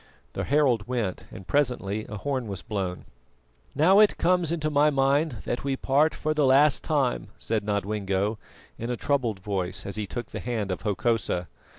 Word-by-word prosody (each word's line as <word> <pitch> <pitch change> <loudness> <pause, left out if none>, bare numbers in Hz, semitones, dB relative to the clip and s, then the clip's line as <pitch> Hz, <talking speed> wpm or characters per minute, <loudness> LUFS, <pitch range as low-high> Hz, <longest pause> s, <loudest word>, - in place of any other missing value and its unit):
The - - -3
herald 130 -7 +2
went, 120 -7 -2
and 95 - -10
presently 110 -7 0
a 105 - -5
horn 130 0 -2
was 100 -3 -6
blown. 95 -4 -4 0.7
"Now 180 +8 +5
it 215 -1 +5
comes 175 -2 +2
into 155 -2 -1
my 150 +1 +4
mind 140 +2 +2
that 120 - -2
we 135 -1 0
part 145 +4 +2
for 155 0 -1
the 155 -1 +1
last 140 +2 +5
time," 140 -6 0
said 110 -2 -2
Nodwengo 100 0 -1 0.4
in 115 - -4
a 125 - -2
troubled 120 -9 0
voice 95 -2 -3
as 100 - -5
he 105 -2 -3
took 120 +2 -6
the - - -5
hand 110 -5 -2
of 90 - -3
Hokosa. 105 -4 0
120 Hz, 180 wpm, -26 LUFS, 100-145 Hz, 0.7 s, Now